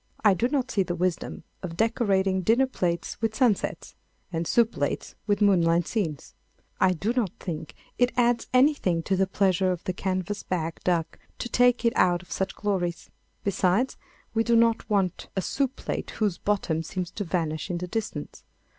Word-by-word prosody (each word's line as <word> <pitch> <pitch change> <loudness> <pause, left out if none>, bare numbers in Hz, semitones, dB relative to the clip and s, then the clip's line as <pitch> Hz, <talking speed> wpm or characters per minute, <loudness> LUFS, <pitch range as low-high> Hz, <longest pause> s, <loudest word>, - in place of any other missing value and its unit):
I 205 - +7
do 210 +6 +1
not 260 -2 -1
see 200 - +2
the 175 -2 -1
wisdom 180 0 -2 0.2
of 170 -3 -6
decorating 195 -4 +2
dinner 230 +8 +4
plates 175 -9 -2
with 225 -1 0
sunsets 235 -6 +1 0.4
and 165 0 -1
soup 235 -1 +3
plates 145 0 -2
with 205 0 +2
moonlight 170 -4 +4
scenes. 165 - -3 0.5
I 185 -1 +4
do 195 +8 -1
not 245 -6 +1
think 160 -3 -6 0.2
it 245 0 +4
adds 240 -1 +2
anything 255 - +3
to 190 - +1
the 190 0 +2
pleasure 190 -1 +2
of 180 - -4
the 185 - -2
canvas 185 +2 -2
back 165 -3 -3
duck 170 -3 0 0.2
to 240 - -4
take 245 0 +3
it 230 - +4
out 175 0 +3
of - - -19
such 190 0 -2
glories. 185 -4 -2 0.3
Besides, 200 +5 +1 0.4
we 225 0 +2
do 235 0 +3
not 230 0 +3
want 195 -4 0
a 190 - +1
soup 270 -1 -1
plate - - -4
whose 205 -5 0
bottom 190 -6 0
seems 180 +2 -4
to 205 - -4
vanish 165 -2 -2
in 175 - -1
the 180 - -3
distance. 205 -7 -4
190 Hz, 180 wpm, -26 LUFS, 175-225 Hz, 0.5 s, I